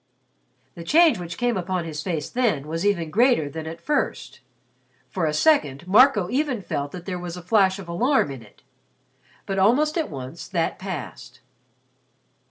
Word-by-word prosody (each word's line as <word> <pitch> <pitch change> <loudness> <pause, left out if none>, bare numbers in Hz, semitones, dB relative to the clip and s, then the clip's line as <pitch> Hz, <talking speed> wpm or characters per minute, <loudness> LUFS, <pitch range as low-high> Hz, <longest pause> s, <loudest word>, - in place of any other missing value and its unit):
The 170 - -9
change 310 - +4
which 170 -1 -7
came 245 -1 0
upon 185 -1 -2
his 155 -2 -5
face 165 -5 -3
then 220 - 0
was 165 +2 -3
even 170 -6 0
greater 235 - +3
than 160 +2 -7
at 165 +1 -7
first. 170 - -2 0.7
For 165 +2 -1
a - - 0
second, 160 - +2
Marco 210 -1 +5
even 260 -5 -1
felt 145 -4 -3
that 175 -1 -9
there 180 -2 -4
was 175 0 -6
a - - -7
flash 190 0 +3
of 195 -3 -9
alarm 185 - +1
in 135 -3 -8
it. 105 - -19 0.8
But 195 0 -2
almost 295 - +3
at 320 - -2
once 135 +3 -8
that 170 -4 -2
passed. 185 -5 -7
180 Hz, 170 wpm, -23 LUFS, 160-240 Hz, 0.8 s, Marco